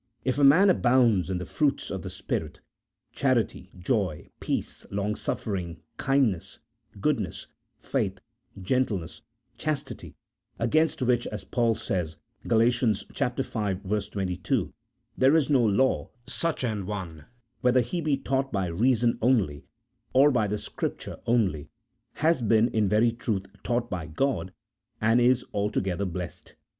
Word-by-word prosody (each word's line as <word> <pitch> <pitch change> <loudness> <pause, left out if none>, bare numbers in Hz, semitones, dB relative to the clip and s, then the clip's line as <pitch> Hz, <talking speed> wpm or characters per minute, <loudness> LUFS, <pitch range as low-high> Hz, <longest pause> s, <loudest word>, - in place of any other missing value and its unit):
If 130 +2 0
a - - +3
man 180 +8 +7
abounds 120 - +3
in 95 - -1
the 90 - -5
fruits 145 -2 0
of 95 - -3
the - - -6
Spirit, - - -4 0.5
charity, 120 -8 0
joy, 95 - -1
peace, - - -3
long 100 +1 -1
suffering, 90 -8 -3 0.2
kindness, 135 -10 +1 0.4
goodness, - - -1 0.4
faith, 95 -1 -1 0.4
gentleness, 100 -4 -1 0.4
chastity, 155 -2 -4 0.4
against 155 +4 +1
which, 120 -1 +2
as 105 - -6
Paul 115 -2 +1
says 90 -7 -3 0.3
(Gal. 115 -1 +4
v. 115 -2 0
22), 95 -2 -2 0.4
there 135 +4 +4
is 150 -2 +2
no 130 -4 +5
law, 115 +5 +2 0.2
such 165 -5 -2
an 105 -6 -2
one, 85 -7 -6 0.3
whether 125 +2 +4
he 170 +9 -3
be 150 -3 +1
taught 135 0 -1
by 95 -2 0
reason 115 +7 +2
only 95 - +1 0.5
or 140 +3 +6
by 110 -5 +2
the 105 +1 -1
Scripture - - -5
only, 100 -11 +1 0.4
has 160 -2 +2
been 115 +1 +4
in 105 -3 +1
very 110 +3 +4
truth 110 -4 -2 0.2
taught 120 -1 -1
by 85 -4 -3
God, 95 - -1 0.5
and 115 +3 +3
is 125 +1 +3
altogether 100 -2 -1
blessed. 90 -1 -6
115 Hz, 130 wpm, -27 LUFS, 95-130 Hz, 0.5 s, man